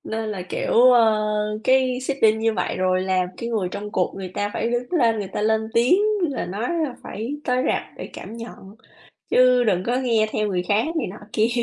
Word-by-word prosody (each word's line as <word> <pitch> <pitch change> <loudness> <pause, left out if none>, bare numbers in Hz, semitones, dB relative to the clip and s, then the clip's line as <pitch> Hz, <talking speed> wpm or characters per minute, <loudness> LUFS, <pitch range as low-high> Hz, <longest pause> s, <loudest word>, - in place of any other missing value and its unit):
Nên 220 0 -3
là, 195 -3 -4
kiểu, - - -2
ờ, 230 -3 +5 0.4
cái 255 -1 +3
seeding 250 -5 +2
như 225 0 +1
vậy 180 - -2
rồi 185 0 +1
làm 185 -1 0
cái 235 - -5
người 210 -6 -1
trong 205 +2 -6
cuộc 180 - 0
người 190 -1 -5
ta 205 0 -1
phải 230 - -1
đứng 245 +3 -3
lên, 235 -10 +2
người 200 - -4
ta - - -2
lên 220 +1 +2
tiếng 245 +11 +4 0.2
là 285 -6 -1
nói 205 +6 -3 0.2
là 260 - -5
phải 235 +8 -5
tới 250 0 +1
rạp - - +1
để - - -8
cảm 230 - -9
nhận, 225 -3 -10 0.5
chứ 250 -1 +5
đừng 185 -5 +1
có 245 +1 +1
nghe 230 -4 +2
theo 215 -1 0
người 180 -2 -1
khác 210 +2 +2
này - - 0
nọ 205 - -9 0.2
kia. 220 +2 +2
225 Hz, 215 wpm, -22 LUFS, 205-250 Hz, 0.5 s, ờ